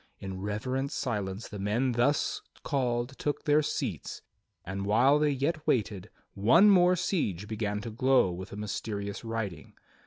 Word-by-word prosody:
In 95 Hz, -1 st, -6 dB
reverent 130 Hz, +7 st, -2 dB
silence 105 Hz, -6 st, -3 dB
the 105 Hz, -, -8 dB
men 110 Hz, +6 st, +1 dB
thus 120 Hz, +5 st, +1 dB, 0.2 s
called 125 Hz, -2 st, -1 dB
took 145 Hz, -, -2 dB
their 150 Hz, -1 st, +4 dB
seats, -, -, -4 dB, 0.4 s
and 100 Hz, +2 st, -4 dB
while 130 Hz, +8 st, +4 dB
they 150 Hz, 0 st, +3 dB
yet 145 Hz, +3 st, -1 dB
waited, 105 Hz, -6 st, 0 dB, 0.2 s
one 165 Hz, -, +6 dB
more 180 Hz, -1 st, +5 dB
siege 145 Hz, -, -1 dB
began 105 Hz, -1 st, -2 dB
to 115 Hz, +1 st, -6 dB
glow 125 Hz, -3 st, +3 dB
with 95 Hz, +3 st, -7 dB
the -, -, -8 dB
mysterious 100 Hz, -1 st, -4 dB
writing. 110 Hz, -10 st, -5 dB
115 Hz, 150 wpm, -29 LUFS, 100-140 Hz, 0.4 s, one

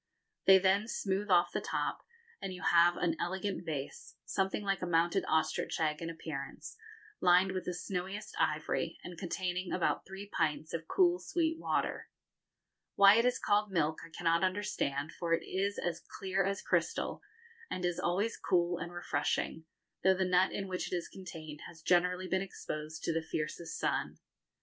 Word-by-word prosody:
They 190 Hz, 0 st, +9 dB
then 195 Hz, +3 st, +3 dB
smooth 200 Hz, -2 st, -1 dB
off 175 Hz, -2 st, +5 dB
the -, -, -1 dB
top, -, -, -2 dB, 0.4 s
and 195 Hz, -, -3 dB
you 180 Hz, -2 st, -8 dB
have 175 Hz, +1 st, +5 dB
an 165 Hz, -2 st, +1 dB
elegant 190 Hz, +2 st, -2 dB
vase, 155 Hz, 0 st, -5 dB
something 195 Hz, +2 st, -1 dB
like 195 Hz, -1 st, 0 dB
a 180 Hz, -, -2 dB
mounted 170 Hz, +3 st, +2 dB
ostrich 160 Hz, 0 st, 0 dB
egg 155 Hz, -1 st, 0 dB
in 165 Hz, -, -3 dB
appearance, 155 Hz, -4 st, -6 dB, 0.4 s
lined 180 Hz, +2 st, +5 dB
with 185 Hz, -1 st, -3 dB
the 180 Hz, -, -2 dB
snowiest 190 Hz, +3 st, -4 dB
ivory, 155 Hz, +2 st, 0 dB
and 175 Hz, -, -7 dB
containing 180 Hz, +1 st, -3 dB
about 180 Hz, -, +1 dB
three 195 Hz, +2 st, -8 dB
pints 155 Hz, -4 st, -1 dB
of 165 Hz, -1 st, -4 dB
cool 360 Hz, -2 st, +4 dB
sweet 325 Hz, -1 st, 0 dB
water. -, -, -1 dB, 0.9 s
Why 200 Hz, +2 st, +8 dB
it 230 Hz, -, +4 dB
is 250 Hz, -, +3 dB
called 210 Hz, 0 st, +2 dB
milk 160 Hz, -3 st, +1 dB
I -, -, -10 dB
cannot 165 Hz, 0 st, +1 dB
understand, 160 Hz, -6 st, -1 dB
for 165 Hz, -1 st, +1 dB
it -, -, -6 dB
is 200 Hz, +2 st, -1 dB
as 175 Hz, -2 st, -2 dB, 0.2 s
clear 195 Hz, 0 st, 0 dB
as 195 Hz, +1 st, -2 dB
crystal, -, -, 0 dB, 0.5 s
and 180 Hz, -, -2 dB
is 175 Hz, 0 st, 0 dB
always 200 Hz, +6 st, 0 dB
cool 175 Hz, -1 st, +1 dB
and 170 Hz, -, -5 dB
refreshing, 160 Hz, -1 st, -1 dB, 0.4 s
though 190 Hz, 0 st, +5 dB
the 190 Hz, 0 st, +1 dB
nut 180 Hz, +1 st, +3 dB
in 195 Hz, -, -3 dB
which 180 Hz, -2 st, -3 dB
it -, -, +1 dB
is 175 Hz, -, -3 dB
contained 160 Hz, -5 st, -9 dB
has 165 Hz, -2 st, -14 dB
generally 180 Hz, +1 st, +2 dB
been 190 Hz, +1 st, +1 dB
exposed 155 Hz, -4 st, -6 dB
to 165 Hz, -, 0 dB
the 165 Hz, -, 0 dB
fiercest 160 Hz, +1 st, -4 dB
sun. -, -, -1 dB
180 Hz, 175 wpm, -33 LUFS, 165-195 Hz, 0.9 s, They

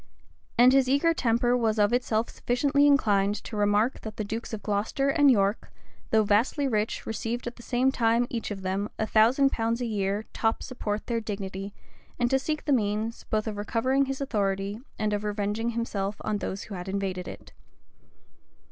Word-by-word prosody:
And 250 Hz, +2 st, +7 dB
his 270 Hz, -2 st, +4 dB
eager 285 Hz, +5 st, +3 dB
temper 240 Hz, -3 st, +2 dB
was 225 Hz, -3 st, +1 dB
of 210 Hz, +2 st, +3 dB
itself 235 Hz, -2 st, +1 dB
sufficiently 280 Hz, +4 st, +2 dB
inclined 205 Hz, -8 st, +3 dB
to 225 Hz, -, -7 dB
remark 205 Hz, +4 st, +1 dB
that 220 Hz, -1 st, -8 dB
the 215 Hz, -, -2 dB
dukes 225 Hz, +3 st, -5 dB
of 215 Hz, -3 st, -5 dB
Glocester 215 Hz, +7 st, 0 dB
and 290 Hz, -1 st, +5 dB
York, 200 Hz, -3 st, +1 dB, 0.4 s
though 220 Hz, -1 st, +4 dB
vastly 230 Hz, +8 st, +2 dB
rich 215 Hz, -3 st, -1 dB
received 230 Hz, +2 st, -3 dB
at 240 Hz, -, -5 dB
the -, -, -13 dB
same 255 Hz, +2 st, +1 dB
time 235 Hz, -1 st, +2 dB
each 235 Hz, -2 st, -4 dB
of 195 Hz, -2 st, -6 dB
them 195 Hz, +3 st, -1 dB
a 220 Hz, -, 0 dB
thousand 245 Hz, +6 st, +4 dB
pounds 230 Hz, +1 st, -1 dB
a 245 Hz, -, -2 dB
year 205 Hz, -1 st, -1 dB
top 225 Hz, 0 st, 0 dB
support 215 Hz, -4 st, -4 dB
their 235 Hz, -2 st, -1 dB
dignity 200 Hz, -2 st, -5 dB, 0.5 s
and 240 Hz, 0 st, 0 dB
to 265 Hz, -, +4 dB
seek 305 Hz, +3 st, -3 dB
the 290 Hz, -, +2 dB
means, 215 Hz, -1 st, -1 dB
both 215 Hz, -1 st, -1 dB
of 215 Hz, -2 st, -4 dB
recovering 255 Hz, +6 st, +1 dB
his 270 Hz, 0 st, -3 dB
authority, 200 Hz, -5 st, -1 dB, 0.2 s
and 215 Hz, -1 st, 0 dB
of 205 Hz, 0 st, -1 dB
revenging 210 Hz, +2 st, -1 dB
himself 210 Hz, -4 st, -2 dB
on 210 Hz, -, -1 dB
those 195 Hz, 0 st, -4 dB
who 210 Hz, -, -9 dB
had 180 Hz, 0 st, -6 dB
invaded 190 Hz, -2 st, -3 dB
it. -, -, -10 dB
225 Hz, 185 wpm, -27 LUFS, 205-245 Hz, 0.5 s, And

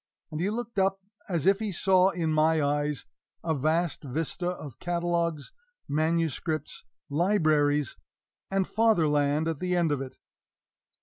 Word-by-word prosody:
And 155 Hz, -, -4 dB
he 190 Hz, -, +1 dB
looked 230 Hz, -1 st, -3 dB
up 195 Hz, 0 st, +2 dB, 0.3 s
as 170 Hz, -5 st, -1 dB
if 195 Hz, +1 st, +4 dB
he 215 Hz, -2 st, -2 dB
saw 185 Hz, +1 st, +4 dB
in 165 Hz, -4 st, -1 dB
my 155 Hz, +1 st, +3 dB
eyes 145 Hz, 0 st, 0 dB, 0.4 s
a 165 Hz, -, 0 dB
vast 155 Hz, +4 st, 0 dB
vista 160 Hz, +6 st, -2 dB
of 150 Hz, -8 st, -7 dB
catalogues, 170 Hz, -3 st, -1 dB, 0.4 s
manuscripts, 160 Hz, 0 st, -1 dB, 0.2 s
libraries, 150 Hz, -, +2 dB, 0.5 s
and 195 Hz, -1 st, +1 dB
Fatherland 155 Hz, -8 st, +2 dB
at 160 Hz, -3 st, -2 dB
the 180 Hz, 0 st, 0 dB
end 170 Hz, -3 st, +2 dB
of 145 Hz, -2 st, 0 dB
it. 130 Hz, -1 st, -8 dB
165 Hz, 135 wpm, -28 LUFS, 150-180 Hz, 0.5 s, if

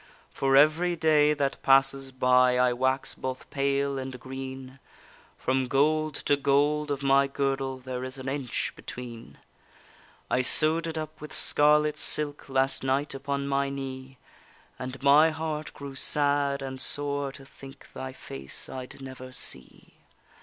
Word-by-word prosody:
For 135 Hz, 0 st, +1 dB
every 160 Hz, +5 st, +4 dB
day 150 Hz, -2 st, +3 dB
that 140 Hz, -2 st, -2 dB
passes 135 Hz, 0 st, +3 dB
by 125 Hz, -1 st, +3 dB
I 125 Hz, 0 st, +3 dB
wax 130 Hz, +2 st, 0 dB
both 130 Hz, 0 st, -6 dB
pale 140 Hz, -1 st, 0 dB
and 130 Hz, -1 st, -6 dB
green, 130 Hz, 0 st, -8 dB, 0.6 s
From 130 Hz, 0 st, 0 dB
gold 155 Hz, +3 st, +1 dB
to 145 Hz, -, +4 dB
gold 145 Hz, +2 st, +1 dB
of 140 Hz, -1 st, -3 dB
my 135 Hz, 0 st, +4 dB
girdle 135 Hz, -1 st, -2 dB
There 130 Hz, 0 st, -6 dB
is 130 Hz, +1 st, -5 dB
an 130 Hz, 0 st, -8 dB
inch 135 Hz, -2 st, -3 dB
between. 120 Hz, -2 st, -9 dB, 0.9 s
I 130 Hz, -, +1 dB
sew'd 155 Hz, +5 st, +5 dB
it 160 Hz, 0 st, -5 dB
up 155 Hz, 0 st, -6 dB
with 150 Hz, -, -8 dB
scarlet 150 Hz, 0 st, +4 dB
silk 145 Hz, -2 st, +1 dB
Last 135 Hz, 0 st, 0 dB
night 135 Hz, +2 st, 0 dB
upon 140 Hz, 0 st, -3 dB
my 140 Hz, 0 st, 0 dB
knee, 135 Hz, -1 st, -7 dB, 0.6 s
And 130 Hz, +1 st, -7 dB
my 145 Hz, +3 st, +6 dB
heart 155 Hz, -1 st, -4 dB
grew 140 Hz, -1 st, -8 dB
sad 140 Hz, 0 st, +1 dB
and 130 Hz, -1 st, -5 dB
sore 145 Hz, -1 st, 0 dB
to 135 Hz, -, -11 dB
think 135 Hz, 0 st, -14 dB
Thy 130 Hz, 0 st, -6 dB
face 70 Hz, -, -4 dB
I'd 130 Hz, +1 st, -8 dB
never 130 Hz, -1 st, -9 dB
see. -, -, -5 dB
135 Hz, 145 wpm, -27 LUFS, 130-145 Hz, 0.9 s, my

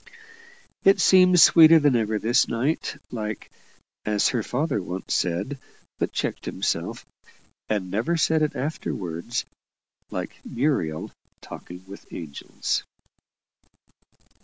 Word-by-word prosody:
It 195 Hz, 0 st, +5 dB
seemed 185 Hz, -1 st, +6 dB
sweeter 165 Hz, 0 st, +8 dB
than 145 Hz, -4 st, +3 dB
ever 110 Hz, -2 st, 0 dB
this 115 Hz, +3 st, +2 dB
night, 135 Hz, +5 st, -2 dB
like 110 Hz, -3 st, -5 dB, 0.5 s
as 105 Hz, -1 st, +2 dB
her 120 Hz, -, -1 dB
father 130 Hz, 0 st, -1 dB
once 90 Hz, +1 st, -5 dB
said, 100 Hz, +11 st, -1 dB, 0.4 s
but -, -, -1 dB
checked -, -, -3 dB
himself, -, -, -3 dB, 0.6 s
and 95 Hz, -4 st, -2 dB
never 120 Hz, -, 0 dB
said 160 Hz, 0 st, +2 dB
it 150 Hz, -, 0 dB
afterwards 115 Hz, -, -4 dB, 0.6 s
like -, -, -6 dB
Muriel 115 Hz, -, -1 dB, 0.3 s
talking 90 Hz, +1 st, -11 dB
with 100 Hz, +1 st, -12 dB
angels. 75 Hz, -5 st, -4 dB
115 Hz, 110 wpm, -24 LUFS, 95-155 Hz, 0.6 s, sweeter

